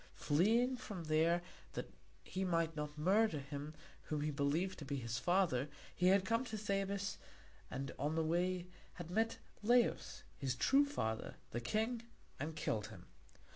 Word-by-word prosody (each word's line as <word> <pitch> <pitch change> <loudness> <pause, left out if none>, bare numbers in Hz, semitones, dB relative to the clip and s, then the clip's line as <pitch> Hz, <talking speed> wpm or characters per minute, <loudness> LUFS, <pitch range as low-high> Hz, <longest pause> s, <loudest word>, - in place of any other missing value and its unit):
Fleeing 225 - +3
from 205 -8 -6
there 165 +2 +3 0.3
that - - -5 0.3
he 190 - -3
might 165 -3 +1
not 150 0 -4
murder 190 +3 +3
him 145 +2 -6 0.3
whom 150 -1 -1
he 150 +1 0
believed 150 +7 0
to - - -5
be 140 +1 -2
his 115 -3 -2
father, 175 -6 +2 0.3
he 180 - +3
had 195 +1 +5
come 230 +4 +2
to 220 -3 -4
Thebes, 195 -1 -1 0.5
and 135 0 -3
on 145 +3 0
the 160 - +2
way 175 +2 +1 0.3
had 175 -1 -7
met 225 +4 +1 0.2
Laius, 240 +2 +2 0.2
his 135 -2 0
true 275 - +5
father, 110 - -2 0.2
the 120 - -2
king, 220 - 0 0.4
and 155 +3 -3
killed 115 -8 -1
him. - - -11
170 Hz, 160 wpm, -38 LUFS, 145-200 Hz, 0.5 s, had